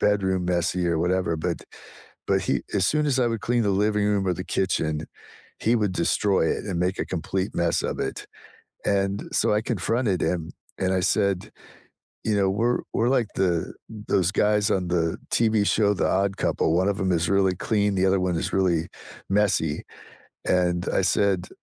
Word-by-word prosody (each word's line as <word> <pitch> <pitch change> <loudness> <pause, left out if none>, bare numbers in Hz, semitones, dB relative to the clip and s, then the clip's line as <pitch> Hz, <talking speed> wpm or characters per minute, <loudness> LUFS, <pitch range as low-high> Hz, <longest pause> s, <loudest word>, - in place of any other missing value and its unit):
bedroom 95 -3 +1
messy 90 0 0
or 85 -1 +1
whatever, 90 -1 0
but 80 - -2 0.7
but - - +2
he - - 0
as 95 -2 +2
soon 150 +7 +1
as 135 -2 +1
I 120 - +3
would 115 -2 -3
clean 120 0 +1
the 100 - +1
living 105 -1 +1
room 100 -2 +1
or 90 - +2
the 90 - -6
kitchen, 80 -5 0 0.5
he 120 +2 +2
would 105 -4 0
destroy 90 +1 +1
it - - -2
and 95 -5 -3
make 90 +1 0
a - - -1
complete 95 +2 -3
mess 85 -1 +1
of - - -3
it. - - -4 0.6
And 100 0 0
so, - - +2
I 105 - +2
confronted 110 -1 0
him, 85 -2 -1 0.3
and 95 0 +1
I 95 - +1
said, 100 +1 0 0.7
you 110 -2 +1
know, 95 -1 +2
"We're 115 +5 +1
we're 120 +2 +2
like 115 - -3
the 85 -4 0 0.2
those 105 -4 0
guys 105 -1 +2
on 90 -2 0
the 85 -2 0
TV 110 -3 +2
show, 105 -1 +3
The - - 0
Odd 100 +1 0
Couple; 80 - +1
one 95 +3 +2
of 100 - -1
them 95 -1 0
is 85 0 +1
really 95 -2 +2
clean, 105 +1 0
the 95 +1 +2
other 95 0 +3
one 90 -2 0
is - - -2
really 85 -4 +1 0.4
messy." 95 -7 +1 0.6
And 90 -1 +1
I - - +2
said, 95 -3 +1
95 Hz, 190 wpm, -25 LUFS, 90-105 Hz, 0.7 s, I